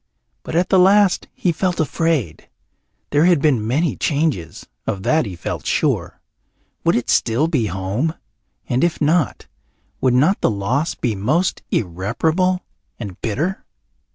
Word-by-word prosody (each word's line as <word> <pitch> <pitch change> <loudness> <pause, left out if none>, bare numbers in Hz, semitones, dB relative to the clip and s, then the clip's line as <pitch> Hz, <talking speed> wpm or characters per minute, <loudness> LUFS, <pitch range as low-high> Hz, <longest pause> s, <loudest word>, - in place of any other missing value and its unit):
But - - -6
at 175 +2 +2
the 190 - +5
last 195 +1 +4
he 180 - 0
felt 180 +2 -1
afraid. 155 - -1 0.6
There 145 +3 +4
had 175 -4 +4
been 130 -8 +1
many 150 +8 +1
changes, 145 - -1 0.2
of 95 -1 -2
that 155 -1 +2
he 95 - -6
felt 85 - -5
sure. - - 0 0.6
Would 170 - +3
it 120 - -1
still 120 +7 +2
be 135 -10 0
home? 100 - -2 0.5
And 125 +1 +1
if 175 -1 +1
not, 155 -1 +1 0.6
would 130 -2 +3
not 155 +10 +3
the - - +3
loss 120 +10 -1
be 120 -4 -1
most 150 - 0
irreparable 155 - 0 0.4
and 100 -6 -7
bitter? 155 - -2
145 Hz, 145 wpm, -20 LUFS, 110-170 Hz, 0.6 s, the